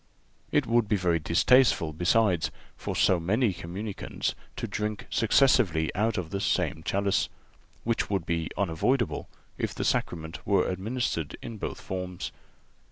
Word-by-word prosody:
(387) -, -, +1 dB
It 115 Hz, -, +1 dB
would 120 Hz, -3 st, +3 dB
be 105 Hz, -, +3 dB
very 90 Hz, -3 st, +2 dB
distasteful, 85 Hz, +1 st, +4 dB
besides, 90 Hz, +1 st, +2 dB, 0.3 s
for -, -, -4 dB
so 90 Hz, -, +4 dB
many 105 Hz, +5 st, +2 dB
communicants 95 Hz, +5 st, -4 dB, 0.2 s
to -, -, -3 dB
drink 105 Hz, -1 st, -3 dB
successively 110 Hz, -, +3 dB
out 110 Hz, +2 st, +1 dB
of 90 Hz, -2 st, -3 dB
the 100 Hz, -, -1 dB
same 80 Hz, -, 0 dB
chalice, 100 Hz, +2 st, +1 dB, 0.5 s
which 115 Hz, 0 st, 0 dB
would 95 Hz, -4 st, 0 dB
be 85 Hz, -2 st, -1 dB
unavoidable 100 Hz, +8 st, 0 dB, 0.3 s
if -, -, -2 dB
the -, -, -2 dB
Sacrament 80 Hz, -1 st, -1 dB
were 100 Hz, -2 st, +2 dB
administered 95 Hz, -, -2 dB
in 115 Hz, -2 st, -6 dB
both -, -, -4 dB
forms. 90 Hz, -1 st, -5 dB
95 Hz, 145 wpm, -28 LUFS, 85-110 Hz, 0.5 s, distasteful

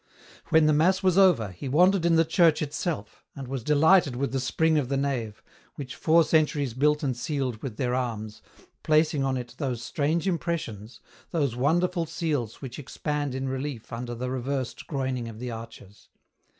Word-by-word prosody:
When 160 Hz, -1 st, +5 dB
the 155 Hz, -, +4 dB
mass 185 Hz, +6 st, +3 dB
was 185 Hz, -2 st, +3 dB
over, 180 Hz, -, +4 dB
he 90 Hz, +9 st, -7 dB
wandered 180 Hz, +4 st, +4 dB
in 165 Hz, -, +4 dB
the 165 Hz, 0 st, +4 dB
church 165 Hz, -1 st, +3 dB
itself, 145 Hz, -, -4 dB
and 135 Hz, -2 st, -7 dB
was 130 Hz, -2 st, -4 dB
delighted 150 Hz, 0 st, +4 dB
with 140 Hz, +2 st, -2 dB
the 135 Hz, -, -1 dB
spring 160 Hz, +4 st, +2 dB
of 130 Hz, -4 st, -3 dB
the 140 Hz, -, 0 dB
nave, 125 Hz, -7 st, -3 dB, 0.3 s
which 130 Hz, -4 st, -7 dB
four 165 Hz, +1 st, +4 dB
centuries 150 Hz, -5 st, +1 dB
built 150 Hz, +4 st, +2 dB
and 130 Hz, -3 st, 0 dB
sealed 125 Hz, -2 st, -3 dB
with 120 Hz, -6 st, -6 dB
their 125 Hz, -2 st, -1 dB
arms, 110 Hz, -4 st, -3 dB, 0.4 s
placing 155 Hz, -2 st, +2 dB
on 135 Hz, -1 st, 0 dB
it 120 Hz, -1 st, -7 dB
those 125 Hz, -5 st, -2 dB
strange 155 Hz, +7 st, -1 dB
impressions, 155 Hz, -, -3 dB, 0.3 s
those 140 Hz, -8 st, 0 dB
wonderful 170 Hz, +6 st, +1 dB
seals 145 Hz, -9 st, -3 dB
which 130 Hz, +1 st, -7 dB
expand 145 Hz, 0 st, -3 dB
in 130 Hz, 0 st, -3 dB
relief 130 Hz, -3 st, -5 dB
under 120 Hz, +1 st, -4 dB
the 125 Hz, +2 st, -4 dB
reversed 130 Hz, 0 st, -3 dB
groining 130 Hz, -5 st, -2 dB
of 110 Hz, -, -10 dB
the 125 Hz, +1 st, -5 dB
arches. 115 Hz, -3 st, -11 dB
140 Hz, 175 wpm, -26 LUFS, 125-155 Hz, 0.4 s, When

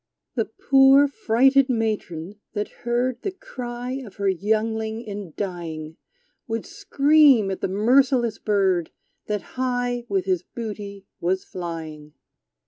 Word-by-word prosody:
The -, -, 0 dB
poor 270 Hz, +1 st, +5 dB
frighted 270 Hz, +1 st, +3 dB
matron, 210 Hz, -6 st, -2 dB
that 210 Hz, -1 st, -2 dB, 0.2 s
heard 245 Hz, +1 st, 0 dB
The -, -, -2 dB
cry 255 Hz, -, -6 dB
of 215 Hz, -, -12 dB
her 200 Hz, -1 st, -1 dB
youngling 220 Hz, +3 st, 0 dB
in 200 Hz, -6 st, -7 dB
dying, 165 Hz, -5 st, -5 dB, 0.5 s
Would 225 Hz, -1 st, -3 dB
scream 295 Hz, -, +4 dB
at 190 Hz, -, -5 dB
the -, -, 0 dB
merciless 235 Hz, +3 st, +3 dB
bird, 190 Hz, -5 st, +1 dB, 0.4 s
That 210 Hz, -2 st, -2 dB, 0.2 s
high 245 Hz, -1 st, -1 dB
with 195 Hz, -2 st, 0 dB
his 185 Hz, -3 st, +1 dB
booty 205 Hz, -2 st, -7 dB
was 185 Hz, +2 st, 0 dB
flying. 160 Hz, -4 st, -7 dB
220 Hz, 125 wpm, -24 LUFS, 190-250 Hz, 0.5 s, poor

